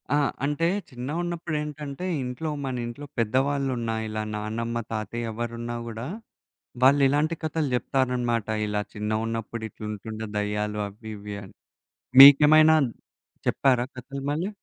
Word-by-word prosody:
ఆ! - - +4 0.3
అంటే 150 +3 +1 0.2
చిన్నగున్నప్పుడేంటంటే, 150 +2 -4 0.2
ఇంట్లో 125 +6 -4 0.2
మన 130 -1 -2
ఇంట్లో 120 +5 -7
పెద్దవాళ్ళు 135 +5 +1
ఉన్న 115 -1 -2 0.2
ఇలా 110 0 -3
నానమ్మ, 110 +2 -3 0.2
తాతయ్య 115 +2 -3
ఎవరున్నా 120 +1 -4
గూడా 115 +2 -5 0.8
వాళ్ళు 140 +2 +6
ఇలాంటి 150 +4 +1
కథలు 160 -1 -1
జెప్తారన్నమాట. 125 -3 0 0.2
"ఇలా 105 0 -1
చిన్నగున్నప్పుడు 110 +2 -3
ఇట్లుంటుండే 110 +1 -6
దెయ్యాలు" 105 0 -1
అవి 110 +2 -10
ఇవి 105 0 -7
అని. 95 - -13 0.7
మీకేమైనా 150 +3 +9 0.7
చెప్పారా 125 -3 +3
కథలు 135 +2 -7
మళ్ళీ? 165 +7 -1
120 Hz, 115 wpm, -26 LUFS, 110-145 Hz, 0.8 s, మీకేమైనా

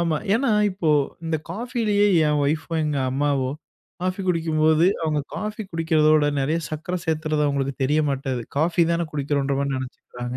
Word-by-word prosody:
ஆமா. 165 -2 +1 0.2
ஏன்னா, 245 +2 +1 0.2
இப்போ 180 -4 0 0.3
இந்த 160 -1 0
காஃபிலேயே 215 0 0 0.2
என் 150 0 +2
ஒய்ஃபோ, 155 +3 -1
எங்க 150 -2 -1
அம்மாவோ 135 -1 0 0.5
காஃபி 185 +1 -1
குடிக்கும்போது 160 -1 +3 0.2
அவங்க 155 -2 0
காஃபி 215 +1 -4
குடிக்கிறதோட, 155 -2 +3 0.2
நிறைய 150 +5 0
சர்க்கரை 160 +4 -3
சேர்த்துறது 155 -1 0
அவங்களுக்கு 140 -1 -1
தெரிய 150 +4 +2
மாட்டது. 135 -3 -2 0.2
காஃபி 170 +3 +2
தானே 170 0 0
குடிக்கிறோம்ன்ற 140 -1 -1
மாதிரி 140 -1 -1
நினைச்சிக்கிறாங்க. 125 -1 -7
155 Hz, 145 wpm, -23 LUFS, 140-170 Hz, 0.5 s, குடிக்கும்போது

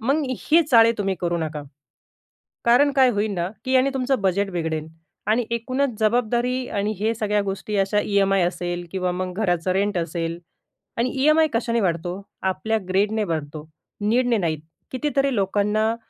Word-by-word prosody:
मग 275 +7 +1 0.3
हे 330 +2 +7
चाळे 230 -1 +6
तुम्ही 195 -1 0
करू 175 -1 0
नका. 155 -2 -4 1.0
कारण 250 +5 +5
काय 260 -2 +6
होईल 210 -1 0
ना, 175 0 -2 0.2
की 260 0 +1
आणि 260 +2 +3
तुमचं 265 -3 0
बजेट 195 +1 +1
बिघडेल. 160 -3 -3 0.4
आणि 225 +2 +2
एकूणच 250 +1 -1
जबाबदारी 245 +3 +1
आणि 205 +1 -1
हे 220 +2 +1
सगळ्या 210 -2 0
गोष्टी 200 +2 -4
अशा 205 +1 +1
ई-एम-आय 195 -2 +2
असेल 175 0 -4
किंवा 185 -2 -1
मग 180 0 -3
घराचं 175 -3 +1
रेंट 200 0 0
असेल 165 0 -3 0.6
आणि 245 +2 +1
ई-एम-आय 310 +1 +5
कशाने 230 0 0
वाढतो? 175 +1 -2 0.2
आपल्या 220 +4 0
ग्रीडने 210 +3 +1
वाढतो, 155 -3 -4 0.3
नीडने 235 +2 +2
नाहीत. 160 -5 -1 0.3
कितीतरी 275 -1 0
लोकांना 210 +3 +1
205 Hz, 155 wpm, -23 LUFS, 180-240 Hz, 1.0 s, हे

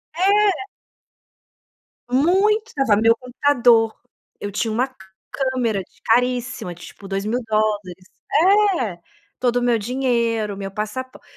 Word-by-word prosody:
É. 395 +2 +3 1.5
Muito, 395 - +2
tava 270 -7 +3
o 205 - 0
meu 230 0 +5
computador, 245 -3 +2 0.4
eu 205 - -5
tinha 220 +2 -1
uma 255 +4 -1 0.4
câmera 255 -6 -1
de 185 - -19
caríssima 245 -5 0
de 175 - -12
tipo 200 - -12
$2.000,00, 210 -2 -2 0.8
é, 195 -8 -4 0.4
todo 245 -1 +1
o - - +1
meu 240 -1 +2
dinheiro, 230 -3 -1
meu 195 -1 -5
passapor 215 +6 -5
235 Hz, 115 wpm, -21 LUFS, 210-260 Hz, 1.5 s, meu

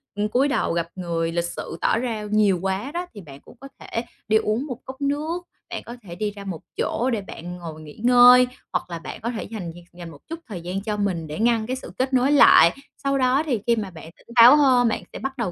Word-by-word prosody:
ừm, 205 +1 -1
cúi 260 +6 +2
đầu 265 -10 0
gập 170 -1 -1
người 165 -2 -2
lịch 170 0 -1
sự - - -6
tỏ - - +2
ra 230 -3 -3
nhiều 205 -4 +3
quá 195 +8 -2
đó 350 +1 -3
thì 205 - -10
bạn 140 -4 -12
cũng - - -17
có 275 - -10
thể 230 - -4 0.2
đi 220 0 +4
uống 220 +5 -1
một 255 -6 -6
cốc 265 +1 -10
nước. 305 +5 -2 0.3
Bạn - - -5
có 235 - -8
thể 175 -5 -10
đi 205 +3 -2
ra 200 -1 -10
một 185 -5 -6 0.2
chỗ 250 +3 0
để 225 -4 -1
bạn 175 -2 -8
ngồi 160 -2 -8
nghỉ 150 -1 -12
ngơi 250 +1 +7 0.3
hoặc - - -2
là 170 -1 -5
bạn 165 - -9
có 235 +2 -2
thể 220 - -5
dành 195 -6 -6
việc 175 0 -13
dành 175 -1 -9
một 145 - -13
chút 330 0 -5
thời 185 -6 -7
gian 185 +3 -4
cho 210 0 -3
mình 185 -6 -2
để 150 +4 -6
ngăn 230 -1 +2
cái 255 - -2
sự 260 - -9
kết 260 +1 -1
nối 260 +2 +3
lại. 220 - +7 0.3
Sau 275 0 +1
đó 260 +3 +2
thì 245 -8 0
khi 235 - +4
mà 210 -4 -4
bạn 165 -2 -11
tỉnh - - -25
táo 240 +4 +9
hơn 255 -4 +4
bạn 225 - -1
sẽ - - -6
bắt 270 0 -5
đầu 230 -7 -2
220 Hz, 265 wpm, -23 LUFS, 175-255 Hz, 0.3 s, táo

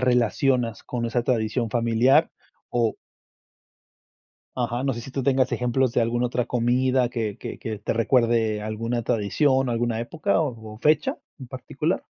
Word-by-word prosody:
relacionas 125 -1 +1
con 120 -2 -3
esa 120 +1 0
tradición 115 -1 0
familiar 120 +6 +3 0.4
o 115 -2 +1 1.6
Ajá, 120 +1 -1
no 135 - +1
sé 120 - -5
si 125 - -9
tú 135 +1 -3
tengas 130 -1 +2
ejemplos 125 +1 +1
de - - +2
alguna 120 +1 +1
otra 125 0 -1
comida 125 +1 +2
que 110 -4 -3
que - - -7
que 110 -5 -5
te - - -1
recuerde 115 -2 +2
alguna 115 +2 -2
tradición 125 +5 +1
o - - 0
alguna 115 -1 -1
época 165 +10 0
o 115 -8 -4
o - - -13
fecha 150 +3 +2 0.2
en 130 - -9
particular. 130 0 -3
120 Hz, 160 wpm, -24 LUFS, 115-130 Hz, 1.6 s, familiar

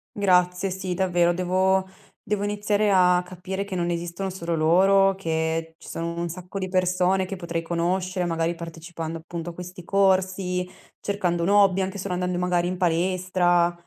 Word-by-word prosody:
Grazie. 180 -1 +2
Sì, 185 0 -3
davvero. 175 -2 +2
Devo 185 +1 +1 0.4
devo 210 -1 0
iniziare 205 0 +1
a 180 -1 +4
capire 185 +2 -5
che 200 -1 -6
non 175 -1 -1
esistono 175 +3 -3
solo 170 -2 -4
loro 190 +5 +4
che 160 -2 -2
ci 165 - -15
sono 170 0 -4
un 170 - -1
sacco 180 +3 -7
di 185 - -2
persone 185 +1 +1
che 195 +1 -6
potrei 170 -2 -3
conoscere, 180 +2 -1
magari 165 0 0
partecipando 165 -1 -7
appunto 170 +1 -6
a - - -14
questi 180 0 -9
corsi, 185 -2 +1 0.3
cercando 180 -4 -1
un 175 - +1
hobby, 200 -2 +5
anche 190 +1 -3
solo 185 -1 -3
andando 180 0 -1
magari 175 -1 +1
in 185 - -2
palestra. 175 0 +2
180 Hz, 165 wpm, -24 LUFS, 170-190 Hz, 0.4 s, hobby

